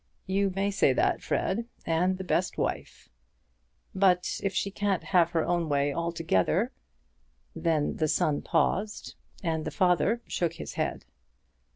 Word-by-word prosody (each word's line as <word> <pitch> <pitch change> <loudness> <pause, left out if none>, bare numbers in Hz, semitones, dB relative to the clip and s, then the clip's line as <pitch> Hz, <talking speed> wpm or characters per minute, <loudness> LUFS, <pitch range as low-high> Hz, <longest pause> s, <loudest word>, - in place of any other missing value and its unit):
"You 195 +1 +1
may 200 +1 0
say 165 -9 +3
that, - - +1
Fred; 225 +5 -1 0.2
and 180 +3 +1
the 190 - -5
best 180 0 0
wife." - - -3 0.9
"But 185 -2 +2
if 195 - 0
she 200 +1 -1
can't 195 -2 -1
have 175 -3 +3
her 165 -2 0
own 175 -2 0
way 140 0 +1
altogether 170 - 0 0.4
" - - -41 0.3
Then 160 -3 0
the 155 - +1
son 150 0 +1
paused, 190 +6 0 0.3
and 160 -2 -1
the - - -3
father 190 +6 +2
shook 170 -2 -1
his - - -7
head. - - -3
180 Hz, 150 wpm, -28 LUFS, 165-195 Hz, 0.9 s, say